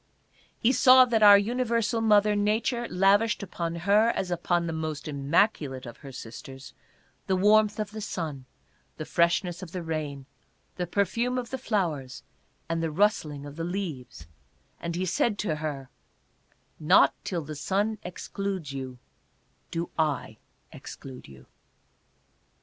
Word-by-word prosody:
He 235 - +3
saw 255 0 +7
that 230 -3 +1
our 205 -1 +9
universal 230 +1 0
mother 210 -1 +4
Nature 225 +4 0
lavished 200 +4 +3
upon 170 -3 -4
her, 200 +6 +3
as 180 - -2
upon 175 0 0
the 165 - -3
most 155 -2 -4
immaculate 140 -2 0
of 120 -1 -9
her 140 - -11
sisters, 130 +3 -10 0.5
the 190 - +2
warmth 210 +2 +4
of 210 -1 -3
the 215 0 -7
sun, 155 -9 -5 0.5
the 155 - -5
fresh 170 +4 +2
ness 175 -1 -6
of 180 -3 -9
the 180 -2 -4
rain, 150 -4 -4 0.5
the 180 -1 -3
perfume 230 +7 0
of 245 -2 -4
the 265 - -3
flowers 160 - -2 0.4
and 165 0 -1
the 165 - -1
rustling 155 -5 0
of 145 +1 -10
the 165 - -3
leaves, 165 - -5 0.5
and 170 0 -4
he 185 +2 -1
said 205 +4 0
to 175 -6 -2
her, 145 -4 -5 0.4
" - - -40 0.2
Not - - +6
till 170 -3 -3
the 155 +1 -7
sun 200 +8 -1
excludes 185 -3 -5
you 130 -2 -6 0.7
do 170 +1 -4
I 145 -8 -1 0.3
exclude 130 -2 -10
you." 65 -1 -15
175 Hz, 150 wpm, -27 LUFS, 150-210 Hz, 0.7 s, our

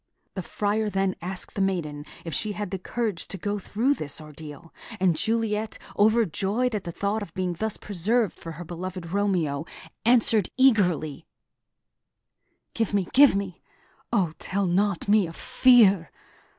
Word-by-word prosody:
The 190 - -4
Friar 210 +3 -1
then 195 -1 0
asked 185 +2 -3
the 200 - -2
maiden 155 -7 -2 0.2
if 165 - -5
she 215 -2 0
had 205 -2 -5
the 190 - -3
courage 215 -2 -3
to 195 - -4
go 205 +3 -2
through 230 +8 +1
this 150 - -2
ordeal; 155 +1 -11 0.3
and 185 -3 +3
Juliet, 220 +2 -1 0.2
overjoyed 220 +2 +2
at 210 -2 -3
the 170 - -4
thought 200 +5 -2
of 205 - -7
being 185 -2 -1
thus 215 +5 -3
preserved 210 +3 0
for 165 - -9
her 170 +3 -8
beloved 175 0 -6
Romeo, 175 -7 0 0.4
answered 225 -4 +4
eagerly: 185 - +2 1.5
"Give 225 -3 -1
me, 195 -4 0
give 275 -3 +7
me! 195 -3 -4 0.5
O 175 -5 +1
tell 200 +1 -1
not 190 +1 0
me 205 -3 +4
of 165 - -10
fear! 205 -9 +4
195 Hz, 150 wpm, -26 LUFS, 175-215 Hz, 1.5 s, give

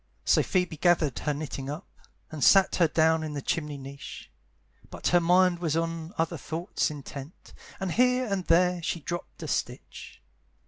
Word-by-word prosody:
So - - +4
Phoebe 180 -4 -1
gathered 160 -5 +2
her 150 - -1
knitting 140 -2 -5
up, 150 +3 -6 0.5
And 155 -2 -4
sat 195 -1 +5
her 170 - +4
down 160 +1 +3
in 155 -1 -4
the - - -2
chimney 150 -3 -2
niche; 135 0 -10 0.6
But - - -2
her 175 - +5
mind 180 +1 +3
was 165 -2 0
on 165 +1 -3
other 165 -1 -1
thoughts 160 -2 -2
intent, 145 +1 -9 0.3
And 190 -2 -2
here 250 +4 +3
and 195 -5 -2
there 180 +1 +3
she 170 - -2
dropped 175 +4 -6
a - - -5
stitch. - - -5
165 Hz, 170 wpm, -27 LUFS, 150-180 Hz, 0.6 s, sat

